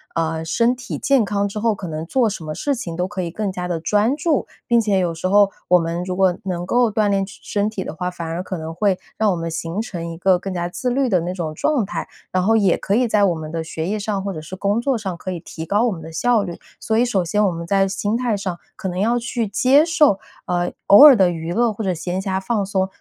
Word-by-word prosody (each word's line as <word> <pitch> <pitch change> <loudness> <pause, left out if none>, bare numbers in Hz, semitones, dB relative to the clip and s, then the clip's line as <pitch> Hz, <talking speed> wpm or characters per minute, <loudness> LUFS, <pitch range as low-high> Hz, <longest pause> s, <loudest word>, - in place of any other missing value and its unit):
呃， 160 -1 -1
身 230 +9 +2
体 250 0 -6
健 275 -4 +3
康 200 0 0
之 205 +1 -5
后， 225 0 +1
可 190 -2 -7
能 155 -1 -4
做 245 +6 +2
什 195 -5 -6
么 155 -1 -5
事 285 - -1
情 175 -9 -5
都 180 +2 -1
可 190 -1 -4
以 175 - -3
更 205 +2 -2
加 180 -1 -4
地 175 -2 -2
专 210 - +2
注。 305 -1 0 0.2
并 235 0 +4
且 205 -3 +1
有 175 -2 0
时 165 +3 -3
候 200 +1 +4 0.2
我 180 - +6
们 170 +1 -2
如 185 -1 -3
果 185 -1 +3
能 175 -2 -3
够 240 +4 +3
锻 210 0 +1
炼 195 -1 +1
身 200 - -14 0.2
身 205 - +1
体 205 -3 -4
的 - - -6
话， 180 +3 -3
反 175 -2 -7
而 165 +2 -3
可 185 0 -5
能 160 0 -6
会 190 +2 +1 0.2
让 220 -1 +2
我 - - 0
们 165 -1 -3
形 165 +5 -3
成 175 -7 -5
一 165 - -7
个 185 0 +3
更 195 0 -5
加 175 -1 -2
自 250 +8 -3
律 265 +2 +1
的 185 -5 +3
那 175 +2 -3
种 165 -4 -4
状 275 - +1
态， 175 -4 -5 0.2
然 185 - +1
后 220 +4 +3
也 200 -3 +3
可 200 - -1
以 250 +2 +3
在 210 -2 +2
我 180 -3 +1
们 155 -1 -7
的 165 0 -2
学 160 0 -4
业 210 +2 -1
上 200 -2 -2
或 200 0 -3
者 155 - -6
是 160 +4 -8
工 200 +3 0
作 265 0 +1
上 195 -5 -4
可 185 - -7
以 175 - -4
提 160 0 -8
高 205 +6 +1
我 240 - +1
们 170 -5 -6
的 160 +1 -9
效 235 +6 +2
率。 175 -3 -6 0.2
所 220 -1 0
以 235 - +4
首 200 -7 +1
先 205 +5 +1
我 195 - +2
们 170 0 -5
在 195 +1 +3
心 205 +2 -1
态 240 -3 0
上 185 -3 -4 0.2
可 205 - -4
能 180 - -5
要 235 +4 +2
去 235 0 -2
接 255 +8 +4
受， 305 - +3 0.3
呃， 175 0 -1 0.2
偶 205 +8 +9
尔 290 -3 +10
的 190 -5 +4
娱 165 0 -4
乐 235 +2 +2
或 220 - -5
者 190 -2 0
闲 180 +3 -3
暇 190 -1 -1
放 205 +2 -1
松， 190 -1 0
195 Hz, 305 characters per minute, -21 LUFS, 175-220 Hz, 0.3 s, 尔